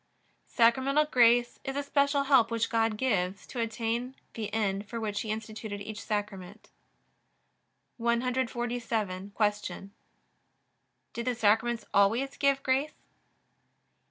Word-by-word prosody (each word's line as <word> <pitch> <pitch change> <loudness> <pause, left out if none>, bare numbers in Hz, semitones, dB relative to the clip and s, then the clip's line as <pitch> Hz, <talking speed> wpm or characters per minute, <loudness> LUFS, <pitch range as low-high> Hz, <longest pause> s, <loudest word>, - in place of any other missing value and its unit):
Sacramental 265 +5 +3
grace 240 -4 +3
is 270 - -4
a 285 - -1
special 280 0 +2
help 270 -5 +4
which 230 -1 -1
God 225 -1 +1
gives, 200 -6 -1
to 250 - -7
attain 230 +3 -2 0.2
the 220 -2 -5
end 200 -2 -1
for 230 - -4
which 210 -2 -2
He 220 - -6
instituted 215 -1 -5
each 210 +1 -7
Sacrament. 205 -1 -5 1.3
147. 235 -5 -1
Q. 205 -2 -1 1.2
Do 235 - -4
the 245 +1 -1
Sacraments 230 +2 +2
always 230 +8 +2
give 275 -1 +2
grace? 265 +3 0
230 Hz, 115 wpm, -29 LUFS, 210-255 Hz, 1.3 s, help